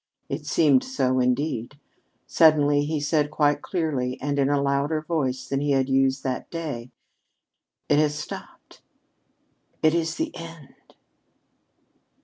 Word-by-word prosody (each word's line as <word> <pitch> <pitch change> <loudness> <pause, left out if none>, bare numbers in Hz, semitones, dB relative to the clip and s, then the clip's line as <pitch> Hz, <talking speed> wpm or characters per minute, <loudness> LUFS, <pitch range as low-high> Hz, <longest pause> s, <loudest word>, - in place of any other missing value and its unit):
It 150 +2 -5
seemed 145 -4 +4
so, 130 - 0
indeed. 125 +1 -1 0.5
Suddenly 145 -3 +4
he 155 0 -1
said 150 0 +1
quite 145 -1 +1
clearly 140 -8 -2
and 145 0 -2
in 140 0 +2
a 145 -1 +2
louder 140 +3 0
voice 130 -6 -2
than 135 +1 -1
he 145 -1 +1
had 135 0 +1
used 135 0 +2
that 130 -1 -3
day: 145 -8 -5 1.0
"It 145 - +3
has 150 -1 +2
stopped. 150 - -9 1.0
It 155 0 +5
is 165 -1 0
the 320 0 -3
end!" 165 -4 -12
145 Hz, 130 wpm, -24 LUFS, 135-155 Hz, 1.0 s, It